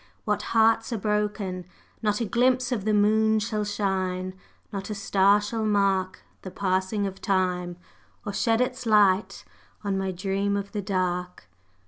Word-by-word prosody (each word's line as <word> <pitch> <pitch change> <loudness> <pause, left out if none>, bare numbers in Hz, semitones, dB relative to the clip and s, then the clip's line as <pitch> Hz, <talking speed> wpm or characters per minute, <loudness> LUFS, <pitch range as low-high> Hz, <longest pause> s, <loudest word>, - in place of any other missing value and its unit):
What 210 -2 0 0.2
hearts 225 +1 +4
are 230 - -1
broken! 210 -3 -2 0.4
Not 210 0 0
a - - +1
glimpse 250 +3 +2
of 215 -5 -2
the 215 - +2
moon 220 +1 +3
shall 215 0 -1
shine, 190 -3 -2 0.4
Not 195 +1 -5
a 210 - -3
star 200 0 +3
shall 220 +2 -3
mark 195 -3 +1 0.2
The 185 - -7
passing 190 +2 -1
of 195 -1 -5
night, 180 -2 0 0.5
or 205 - -4
shed 225 +3 +1
its 250 -1 -2
light 210 -2 +3 0.4
On 195 -2 -1
my 190 0 -2
Dream 195 +2 -1
of 200 0 -5
the 210 - -3
Dark! 180 - -2
200 Hz, 155 wpm, -26 LUFS, 190-215 Hz, 0.5 s, hearts